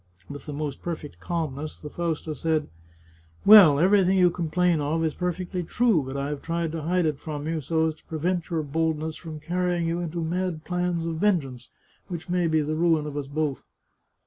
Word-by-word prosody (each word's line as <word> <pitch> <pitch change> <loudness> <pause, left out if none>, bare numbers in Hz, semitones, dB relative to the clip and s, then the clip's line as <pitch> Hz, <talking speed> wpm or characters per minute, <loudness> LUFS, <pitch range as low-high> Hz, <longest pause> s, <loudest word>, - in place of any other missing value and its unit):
With 145 +1 -9
the - - -4
most 145 -2 -4
perfect 160 -4 -6
calmness 155 -3 -4
the 150 - -8
Fausta 160 -1 -3
said: 155 +1 -1 0.4
" 80 0 -30
Well, 195 -9 +9
everything 190 +3 +4
you 180 -1 +5
complain 175 0 +1
of 160 +3 0
is 155 - 0
perfectly 180 +1 -3
true, 215 0 +2
but 135 +1 -5
I 140 +1 -2
have 150 -1 -4
tried 165 -1 -2
to 165 0 -4
hide 175 +3 +1
it 150 -3 -1
from 150 -2 -5
you, 160 -1 -1
so 160 +3 +1
as 160 - 0
to 155 - -25
prevent 170 +2 -2
your 165 -3 -1
boldness 160 +1 -1
from 160 -3 -8
carrying 175 +1 -1
you 170 +1 -1
into 170 -1 -3
mad 175 -1 -2
plans 180 -2 -1
of 165 -1 -3
venge 185 -5 +2
ance 125 -2 -11 0.4
which 175 -2 -6
may 180 -1 +1
be 160 -1 +2
the 150 +1 -2
ruin 160 -1 +2
of 150 -1 -6
us 145 -2 -3
both. 145 -1 -2
160 Hz, 205 wpm, -26 LUFS, 150-175 Hz, 0.4 s, Well